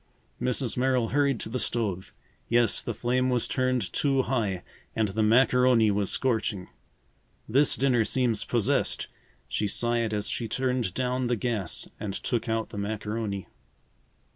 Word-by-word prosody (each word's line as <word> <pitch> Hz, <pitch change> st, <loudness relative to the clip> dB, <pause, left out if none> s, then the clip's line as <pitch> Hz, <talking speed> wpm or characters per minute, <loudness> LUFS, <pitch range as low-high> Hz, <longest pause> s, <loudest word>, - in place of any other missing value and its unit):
Mrs. 125 Hz, -2 st, -1 dB
Merrill 125 Hz, -2 st, +1 dB
hurried 140 Hz, -2 st, +1 dB
to -, -, -4 dB
the 125 Hz, +3 st, -2 dB
stove. 100 Hz, -8 st, -2 dB, 0.4 s
Yes, 120 Hz, 0 st, +4 dB
the 120 Hz, -, -4 dB
flame 125 Hz, +3 st, +1 dB
was 125 Hz, -2 st, 0 dB
turned 130 Hz, -6 st, 0 dB
too 135 Hz, -2 st, +2 dB
high 105 Hz, -9 st, -1 dB, 0.3 s
and 110 Hz, -2 st, +1 dB
the 110 Hz, +3 st, -1 dB
macaroni 125 Hz, 0 st, +4 dB
was 100 Hz, -1 st, 0 dB
scorching. 110 Hz, -7 st, -1 dB, 0.8 s
"This 135 Hz, +6 st, +4 dB
dinner 125 Hz, -4 st, +2 dB
seems 120 Hz, -1 st, +1 dB
possessed," -, -, 0 dB, 0.4 s
she 105 Hz, -, -1 dB
sighed 120 Hz, +1 st, +1 dB
as 105 Hz, -1 st, -1 dB
she 115 Hz, -, -2 dB
turned 125 Hz, -4 st, -1 dB
down 125 Hz, 0 st, 0 dB
the 120 Hz, -, +1 dB
gas 110 Hz, -6 st, -2 dB
and 100 Hz, -2 st, -4 dB
took 115 Hz, +1 st, -2 dB
out 110 Hz, 0 st, -1 dB
the 100 Hz, -, -6 dB
macaroni. 105 Hz, -1 st, -3 dB
120 Hz, 145 wpm, -27 LUFS, 105-125 Hz, 0.8 s, Yes